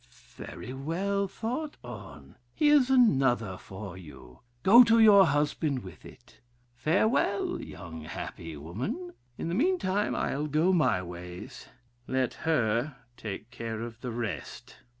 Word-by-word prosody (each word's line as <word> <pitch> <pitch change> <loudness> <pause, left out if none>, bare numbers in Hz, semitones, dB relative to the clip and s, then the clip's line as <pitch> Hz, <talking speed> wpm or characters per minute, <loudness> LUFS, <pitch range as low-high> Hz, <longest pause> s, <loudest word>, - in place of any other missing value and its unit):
Very 125 - -8
well 190 +9 -1
thought 255 - -4
on; - - -10 0.2
here's 295 -4 +4
another 135 - +3
for 95 0 -9
you: 70 -8 -13 0.2
go 235 +6 +9
to 230 -1 +4
your 205 -4 +8
husband 145 -2 0
with 95 -2 -12
it. 120 - -16 0.3
Farewell, 190 - +1
happy 80 0 -8
young 75 -3 -8
woman. 125 - -5 0.2
In - - -4
the 170 - -2
meantime 215 - +1
I'll 145 +2 -1
go 155 +6 +2
my 110 - +2
ways; 90 0 -9 0.4
let 130 -1 0 0.2
her 120 -1 +1 0.2
take 110 0 -7
care 115 -2 -5
of 115 0 -7
the 125 - -4
rest. 115 -3 -5
135 Hz, 130 wpm, -29 LUFS, -, 0.4 s, go